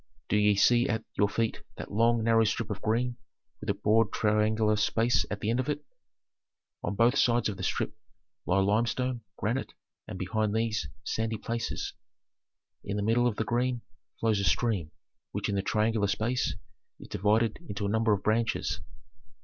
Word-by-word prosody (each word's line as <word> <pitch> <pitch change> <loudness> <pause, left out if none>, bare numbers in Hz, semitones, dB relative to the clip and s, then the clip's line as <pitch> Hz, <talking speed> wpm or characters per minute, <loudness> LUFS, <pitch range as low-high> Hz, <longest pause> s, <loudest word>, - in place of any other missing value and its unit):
"Do - - +2
ye 105 0 +4
see 120 +4 +4
at 110 -1 -1
your 100 -1 +3
feet 115 +2 -1 0.2
that - - -7
long, 115 +2 +3
narrow 115 0 +4
strip 110 0 -1
of 100 - -4
green 120 +2 0 0.4
with - - -6
a 100 - +2
broad 110 +1 +3
triangular 110 0 +2
space 115 +3 +2
at 105 0 -4
the 110 - 0
end 120 - +1
of 130 - -1
it? 150 - -2 1.0
On 100 - -2
both 115 +5 +4
sides 120 -4 +3
of 105 - -4
the - - -7
strip - - -1 0.5
lie 95 +2 +3
limestone, 120 +5 +1 0.2
granite, 120 +5 -2 0.3
and, - - -6
behind 105 +3 -1
these, 110 -8 0 0.2
sandy 110 0 -1
places. 115 +1 -3 0.9
In 100 0 -3
the 100 - -1
middle 120 +3 +3
of 115 - -1
the 110 - -1
green 120 +1 0 0.4
flows 110 -3 +2
a - - -1
stream, 100 -6 +1 0.4
which - - -2
in - - 0
the 100 - +1
triangular 110 +1 +1
space 110 +5 0 0.4
is - - -11
divided 110 +3 +1
into 100 0 -3
a - - 0
number 110 +1 +2
of 100 -2 +1
branches." 115 +2 0
110 Hz, 175 wpm, -29 LUFS, 105-115 Hz, 1.0 s, ye